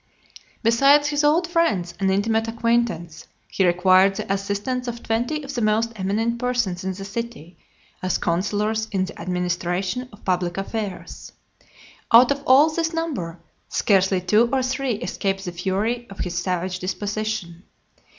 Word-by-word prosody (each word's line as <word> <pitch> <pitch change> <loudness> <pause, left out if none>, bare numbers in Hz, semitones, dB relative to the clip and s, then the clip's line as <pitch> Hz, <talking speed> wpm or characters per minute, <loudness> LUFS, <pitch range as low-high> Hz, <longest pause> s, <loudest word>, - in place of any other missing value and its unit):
LV. - - -15 0.2
Besides 275 +6 +5
his 295 0 0
old 320 +4 +3
friends 210 - +1
and 195 -1 +1
intimate 220 +3 +1
acquaintance, 225 -8 -1 0.2
he 190 - +1
required 185 +2 +4
the 195 - -2
assistance 205 +6 -2
of 235 0 -5
twenty 240 +7 -1
of 280 0 -7
the 240 - -2
most 220 +2 +1
eminent 220 +4 -1
persons 240 -8 -1
in 190 - -2
the 195 +1 -8
city, 205 -5 -6 0.5
as 185 -1 0
counsellors 210 +5 -1
in 190 -2 0
the 190 - -10
administration 180 +6 -2
of 205 - -17
public 180 -1 0
affairs. 200 0 -5 0.8
Out 245 +3 +8
of 280 0 -1
all 285 +5 +6
this 330 +1 -1
number, 185 - -3 0.3
scarcely 190 -2 +2
two 215 +6 +3
or 265 -1 +1
three 260 0 -1
escaped 195 -3 -3
the 175 - -3
fury 200 +7 -2
of 195 - -11
his 175 -1 -4
savage 185 0 -2
disposition. 205 -2 -3
210 Hz, 150 wpm, -23 LUFS, 185-240 Hz, 0.8 s, Out